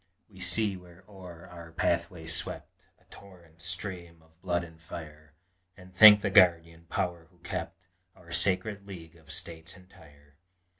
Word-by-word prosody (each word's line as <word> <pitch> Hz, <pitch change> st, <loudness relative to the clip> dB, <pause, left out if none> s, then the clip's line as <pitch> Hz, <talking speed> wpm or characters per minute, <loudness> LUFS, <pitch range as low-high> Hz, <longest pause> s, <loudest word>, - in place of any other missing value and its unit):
We 95 Hz, -4 st, -18 dB
see 95 Hz, +3 st, +1 dB
where 90 Hz, 0 st, -17 dB
o'er 90 Hz, -4 st, -12 dB
our 85 Hz, -2 st, -12 dB
pathway 85 Hz, 0 st, -1 dB
swept 80 Hz, +1 st, -4 dB
A -, -, -29 dB
torrent 85 Hz, -4 st, -16 dB
stream 85 Hz, -2 st, -5 dB
of 80 Hz, +2 st, -29 dB
blood 85 Hz, -2 st, -1 dB
and 80 Hz, -1 st, -14 dB
fire, 75 Hz, -2 st, -11 dB, 0.4 s
And 90 Hz, -1 st, -15 dB
thank 105 Hz, +1 st, +10 dB
the 100 Hz, -, -1 dB
Guardian 85 Hz, -2 st, +4 dB
Power 85 Hz, -2 st, -3 dB
who 90 Hz, -, -28 dB
kept 95 Hz, +1 st, -7 dB, 0.3 s
Our 85 Hz, -1 st, -17 dB
sacred 100 Hz, +3 st, 0 dB
League 85 Hz, -4 st, -11 dB
of 80 Hz, -3 st, -21 dB
States 80 Hz, +2 st, -7 dB
entire. 75 Hz, -6 st, -20 dB
85 Hz, 150 wpm, -29 LUFS, 80-95 Hz, 0.4 s, thank